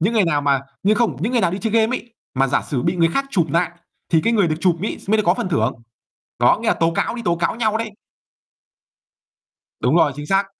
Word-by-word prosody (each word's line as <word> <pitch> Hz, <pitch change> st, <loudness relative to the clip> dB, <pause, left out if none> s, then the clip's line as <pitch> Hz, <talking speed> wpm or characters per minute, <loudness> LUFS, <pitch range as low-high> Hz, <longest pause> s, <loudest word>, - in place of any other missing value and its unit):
những 195 Hz, +8 st, +1 dB
người 215 Hz, -, +4 dB
nào 150 Hz, -4 st, +1 dB
mà 140 Hz, -2 st, +2 dB, 0.2 s
nhưng 205 Hz, +3 st, +3 dB
không, 235 Hz, 0 st, +1 dB
những 220 Hz, +9 st, -1 dB
người 240 Hz, -, +2 dB
nào 180 Hz, -4 st, +2 dB
đi 185 Hz, -, -3 dB
chơi 220 Hz, 0 st, -2 dB
game 225 Hz, +2 st, +2 dB
ấy, 235 Hz, -1 st, -12 dB, 0.2 s
mà 135 Hz, +1 st, +2 dB
giả 135 Hz, -, 0 dB
sử 125 Hz, -4 st, -3 dB
bị 170 Hz, +2 st, 0 dB
người 165 Hz, -1 st, +3 dB
khác 275 Hz, -, +1 dB
chụp 175 Hz, -9 st, +1 dB
nại, 170 Hz, 0 st, +1 dB, 0.4 s
thì 165 Hz, -, +5 dB
cái 230 Hz, -, +2 dB
người 200 Hz, -6 st, +3 dB
được 155 Hz, -, -1 dB
chụp 175 Hz, -2 st, +2 dB
ấy 210 Hz, -, -3 dB
mới 215 Hz, -, +4 dB
được 215 Hz, -, +1 dB
có 175 Hz, -, +4 dB
phần 230 Hz, -2 st, -3 dB
thưởng. 120 Hz, -7 st, +1 dB, 0.7 s
Đó, -, -, +4 dB
nghĩa -, -, -3 dB
là -, -, +4 dB
tố 165 Hz, 0 st, +2 dB
cáo, 170 Hz, -, -1 dB
đi 240 Hz, -, -5 dB
tố 170 Hz, -, +2 dB
cáo 170 Hz, 0 st, -1 dB
nhau 220 Hz, -2 st, 0 dB
đấy. 225 Hz, -1 st, -4 dB, 1.9 s
Đúng 125 Hz, +7 st, +2 dB
rồi, 155 Hz, -4 st, +4 dB
chính 145 Hz, 0 st, -6 dB
xác. 195 Hz, +4 st, +2 dB
180 Hz, 260 wpm, -20 LUFS, 165-220 Hz, 1.9 s, thì